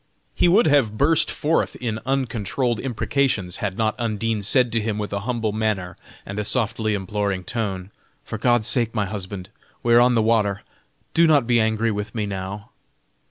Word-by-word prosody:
He -, -, +3 dB
would 200 Hz, +7 st, +5 dB
have 135 Hz, -8 st, +3 dB
burst 150 Hz, +5 st, +3 dB
forth 155 Hz, +2 st, 0 dB
in 110 Hz, -3 st, -3 dB
uncontrolled 125 Hz, -2 st, -1 dB
imprecations 125 Hz, -6 st, -1 dB
had 100 Hz, -3 st, -3 dB
not 110 Hz, -1 st, +1 dB
Undine 115 Hz, -1 st, -1 dB
said 125 Hz, +4 st, +2 dB
to 115 Hz, -, +2 dB
him 105 Hz, -1 st, -2 dB
with 105 Hz, -1 st, -4 dB
a 100 Hz, -, -1 dB
humble 115 Hz, -3 st, 0 dB
manner 105 Hz, -4 st, -2 dB, 0.3 s
and 100 Hz, +2 st, -5 dB
a -, -, -1 dB
softly 110 Hz, -1 st, 0 dB
imploring 100 Hz, -1 st, -2 dB
tone: 100 Hz, -4 st, -4 dB, 0.3 s
"For -, -, -6 dB
God's 120 Hz, -3 st, +2 dB
sake, 120 Hz, -3 st, +1 dB
my 105 Hz, -2 st, +1 dB
husband, 95 Hz, -1 st, -6 dB, 0.3 s
we 120 Hz, -, +3 dB
are 120 Hz, -, +8 dB
on 125 Hz, 0 st, +4 dB
the 110 Hz, -, +3 dB
water, 105 Hz, -3 st, +1 dB, 0.5 s
do 170 Hz, 0 st, +5 dB
not 145 Hz, -6 st, +4 dB
be 120 Hz, -1 st, +3 dB
angry 110 Hz, +1 st, +1 dB
with 105 Hz, +1 st, -5 dB
me 110 Hz, -2 st, -1 dB
now." 100 Hz, +1 st, -6 dB
110 Hz, 180 wpm, -22 LUFS, 105-120 Hz, 0.5 s, are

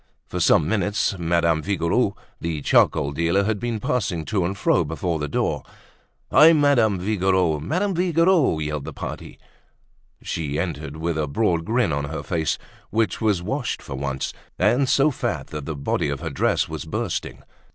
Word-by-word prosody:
For -, -, -5 dB
some 75 Hz, -, +4 dB
minutes, 100 Hz, +1 st, 0 dB
Madame 85 Hz, -1 st, +2 dB
Vigouroux, 100 Hz, +4 st, 0 dB, 0.2 s
the 80 Hz, -4 st, -3 dB
charcoal 75 Hz, -3 st, +3 dB
dealer, 85 Hz, +6 st, +1 dB
had 105 Hz, 0 st, -1 dB
been 120 Hz, -1 st, -2 dB
passing 95 Hz, -9 st, -1 dB
to 100 Hz, -4 st, 0 dB
and 95 Hz, +3 st, -2 dB
fro 85 Hz, -, +2 dB
before 80 Hz, +1 st, -2 dB
the 75 Hz, -, -2 dB
door. -, -, -1 dB, 0.7 s
"Hi! 160 Hz, +2 st, +8 dB
Madame 140 Hz, -9 st, +3 dB
Vigouroux! 95 Hz, -4 st, +1 dB
Madame 180 Hz, -, -1 dB
Vigouroux!" 170 Hz, -, +3 dB
yelled 75 Hz, -2 st, -3 dB
the -, -, -6 dB
party. -, -, -7 dB, 0.9 s
She 75 Hz, -3 st, -3 dB
entered 80 Hz, -3 st, -4 dB
with 80 Hz, 0 st, -2 dB
a 75 Hz, -, 0 dB
broad 85 Hz, 0 st, 0 dB
grin 115 Hz, -6 st, +1 dB
on 70 Hz, 0 st, -1 dB
her 75 Hz, 0 st, -5 dB
face, 80 Hz, -2 st, -1 dB, 0.3 s
which 110 Hz, +1 st, 0 dB
was 105 Hz, -6 st, +1 dB
washed -, -, -2 dB
for -, -, -7 dB
once, 65 Hz, 0 st, -3 dB, 0.2 s
and 120 Hz, +8 st, +2 dB
so 145 Hz, +2 st, +4 dB
fat -, -, -3 dB
that 75 Hz, -2 st, -6 dB
the 80 Hz, -, -3 dB
body 70 Hz, +1 st, -1 dB
of 70 Hz, 0 st, -3 dB
her 80 Hz, -2 st, -4 dB
dress 70 Hz, -, +1 dB
was -, -, -5 dB
bursting. -, -, -4 dB
85 Hz, 170 wpm, -23 LUFS, 80-110 Hz, 0.9 s, Hi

